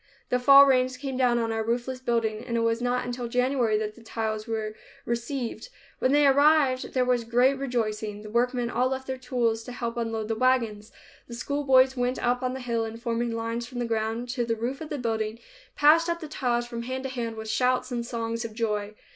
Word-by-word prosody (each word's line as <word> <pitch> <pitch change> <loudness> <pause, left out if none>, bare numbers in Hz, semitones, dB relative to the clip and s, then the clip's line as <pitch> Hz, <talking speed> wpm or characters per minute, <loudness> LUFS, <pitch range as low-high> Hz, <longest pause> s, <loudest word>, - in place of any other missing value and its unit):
The 250 - +2
fall 275 +2 +9
rains 255 -1 +2
came 270 0 -4
down 250 -2 +3
on 230 -1 0
our 225 0 -1
roofless 240 +3 -2
building 230 -3 -1
and 235 -2 -2
it - - +1
was 230 +1 +1
not 245 0 0
until 245 0 -4
January 250 -2 +1
that 210 0 -3
the 235 - -16
tiles 220 -1 -3
were 220 -1 -3 0.3
received. 235 - -3 0.3
When 255 - +2
they 290 +1 +5
arrived, 280 -2 +3
there 255 -1 +3
was 250 -1 +1
great 245 +4 +3
rejoicing. 215 -5 -2
The 215 - -8
workmen 245 +1 0
all 250 +2 +2
left 265 0 -3
their 260 -1 -4
tools 240 -3 0
to - - -7
help 235 -1 -4
unload 225 -2 -2
the 225 - 0
wagons. 225 -3 +1 0.4
The 235 - -8
schoolboys 265 0 +3
went 250 0 0
up 245 +1 0
on 255 0 -2
the 265 - -6
hill 235 -2 -1
and, 225 0 -6
forming 235 -1 -1
lines 230 +1 -3
from 245 - -9
the 240 - -1
ground 225 +1 -2
to 245 -1 -1
the 230 -1 -1
roof 245 +6 -4
of 315 - -6
the 295 - -3
building, 220 -3 -2 0.4
passed 325 +3 +5
up 340 0 -1
the 315 - -7
tiles 245 -5 -1
from 235 -1 -6
hand 260 +2 -4
to 265 - -3
hand 235 -3 -4
with 220 0 -7
shouts 255 +3 +1
and 240 -1 -2
songs 230 -1 -3
of 225 -2 -7
joy. 210 -2 -2
240 Hz, 220 wpm, -26 LUFS, 230-255 Hz, 0.4 s, fall